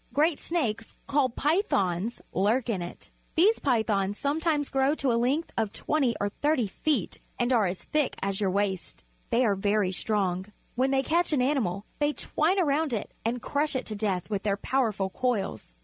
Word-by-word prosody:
Great 300 +1 +3
snakes, 230 -10 -2
called 275 -4 +1
pythons, 230 - 0
lurk 220 +6 +1
in 190 -5 -2
it. 175 - -9 0.2
These 400 +7 +5
P3' 240 -6 +2
thons 200 -1 0
some 285 +3 0
times 305 -3 0
grow 270 +2 +2
to 275 -4 0
a - - +2
length 255 +8 +1
of 220 -3 0
twenty 270 -4 0
or 205 - 0
thirty 290 +2 +1
feet 230 - -1 0.2
and 240 +1 +1
are 220 -5 +4
as 180 +1 -4
thick 300 -3 0
as 195 +1 -2
your 195 - +2
waist. 195 -1 -2 0.3
They 245 +2 +3
are 210 - +3
very 200 0 +1
A - - -3
Python 185 - -6
strong. 190 -4 0 0.3
When 260 +2 +1
they 270 0 +2
catch 340 +1 +1
an 275 - +3
animal, 220 -8 0
they 295 0 +2
twine 340 +7 +1
around 300 -3 +1
it 215 - -3
and 235 +2 -2
crush 290 0 0
it 260 - -1
to 215 - -5
death 200 -4 -1
with 205 -2 -2
their 200 -1 0
powerful 210 -6 0
coils. 200 - -2
240 Hz, 195 wpm, -28 LUFS, 200-290 Hz, 0.3 s, These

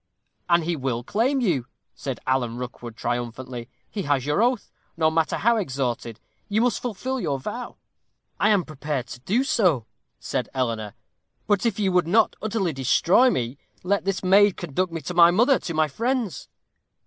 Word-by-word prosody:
'And 170 -1 +4
he 170 +1 -1
will 130 -4 -2
claim 245 - +1
you,' 155 - 0 0.3
said 135 -3 -5
Alan 125 -3 0
Rookwood, 120 -2 -7
triumphantly. 120 0 -4 0.2
'He 205 - -4
has 145 -5 0
your 150 +7 +1
oath, 245 -1 +1 0.3
no 160 -1 +3
matter 160 0 +1
how 235 +2 +3
extorted 130 - -3 0.3
you 210 +1 +1
must 245 -2 +1
fulfil 250 +3 -3
your 145 - -1
vow.' 235 - -6 0.6
'I 205 - +4
am 200 -4 +4
prepared 150 -4 -4
to - - -8
do 210 - +1
so,' 185 - +2 0.3
said - - -3
Eleanor. 115 -5 -2 0.5
'But 205 +2 +2
if 220 - -1
you 195 -2 +2
would 180 -2 +2
not 215 +5 +3
utterly 205 -6 -1
destroy 170 - +4
me, 125 - -2 0.2
let 200 +2 +1
this 195 -1 -2
maid 200 +1 +5
conduct 175 +2 -2
me 165 -1 -4
to 180 - -5
my 170 -1 +7
mother, 240 +9 +4
to 170 - -5
my 155 0 +3
friends.' 230 - -2
170 Hz, 170 wpm, -24 LUFS, 130-210 Hz, 0.6 s, my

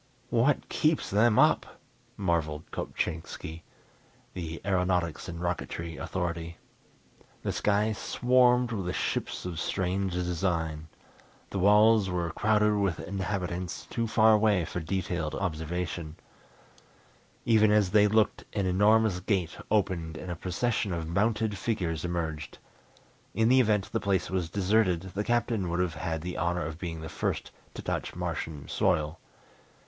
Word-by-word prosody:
"What 125 +4 +2
keeps 155 0 +1
them 105 +2 +4
up!" - - +3 0.4
marvelled 80 -5 -1
Kopchainski, 80 0 -4 0.7
the 85 -2 -5
aeronautics 90 -4 0
and 85 0 -6
rocketry 85 -1 -3
authority. 85 -2 -3 0.9
The - - 0
sky 105 +1 +1
swarmed 125 +2 +3
with 95 -5 -2
ships - - -2
of 85 -3 -4
strange 95 +1 -1
design. 85 -3 -1 0.6
The 100 - -2
walls 105 +1 +5
were 85 -2 -1
crowded 105 +3 +2
with 100 -5 0
inhabitants, 90 -2 -3
too 115 -1 -1
far 110 0 +5
away 105 -5 +3
for 90 - -4
detailed 85 -2 -2
observation. 85 -2 -3 1.3
Even 110 -2 +5
as 105 -3 +3
they 105 -1 +6
looked 110 +1 +2
an 100 -3 0
enormous 105 +1 +3
gate 90 -2 -1
opened 90 -6 0
and 90 +3 -6
a - - -3
procession 95 +3 -1
of 80 -1 -3
mounted 105 +3 0
figures 90 -8 -1
emerged. 80 -3 -3 0.8
In 115 0 +3
the 130 +1 +6
event 105 -5 +2
the - - 0
place 100 -2 0
was 90 -3 -1
deserted, 95 -2 +2
the 100 +2 -1
Captain 115 -5 0
would 85 +1 -1
have 90 -2 0
had 80 -2 -3
the 90 0 -4
honor 85 0 0
of 80 +1 -6
being 80 -3 -5
the 80 - -6
first - - -3 0.2
to - - -7
touch - - -3
Martian 75 -3 -4
soil. 75 +2 0
90 Hz, 135 wpm, -29 LUFS, 85-105 Hz, 1.3 s, they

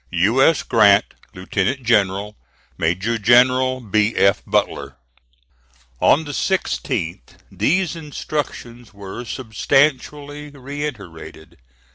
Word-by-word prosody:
"U. 100 +9 +2
S. 160 +3 +4
GRANT, 105 -4 +4 0.3
Lieutenant 100 +7 -2
General. 105 -2 +1 0.4
"MAJOR 95 +8 -1
GENERAL 130 +3 +3
B. 110 0 0
F. 100 -1 +3
BUTLER." 70 -1 -1 1.0
On 160 - +4
the 145 - -7
16th 70 - -3
these 160 - 0
instructions 135 -7 -6
were 100 +4 -8
substantially 145 +5 -1
reiterated. 125 - -8
120 Hz, 90 wpm, -20 LUFS, 100-140 Hz, 1.0 s, S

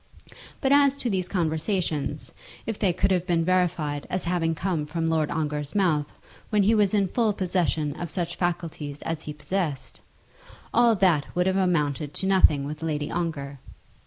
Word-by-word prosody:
But 270 - +1
as 280 -1 +5
to 245 -4 -1
these 185 -2 -1
conversations, 160 -3 -1 0.3
if 225 -2 -4
they 195 -4 +3
could 195 +3 0
have 180 -1 +1
been 170 -2 +2
verified 170 -5 0
as 185 - -2
having 170 -2 0
come 165 -4 -2
from 165 +1 -1
Lord 155 -2 +1
Ongar's 150 -1 -3
mouth 160 -7 +1 0.4
when 210 -2 +3
he 215 +4 +4
was 210 -2 +3
in 200 -2 +2
full 220 +2 +1
possession 170 -6 -1
of 175 0 -5
such 170 +2 -3
faculties 165 -5 -3
as 165 -1 -3
he 150 - -6
possessed, 150 -1 -3 0.7
all 235 -1 +5
that 180 -7 +2
would 180 0 +2
have 190 0 +1
amounted 150 -6 0
to - - 0
nothing 185 -7 +4
with 150 +2 -6
Lady 150 -2 -2
Ongar. 145 -5 -3
170 Hz, 170 wpm, -25 LUFS, 150-190 Hz, 0.7 s, as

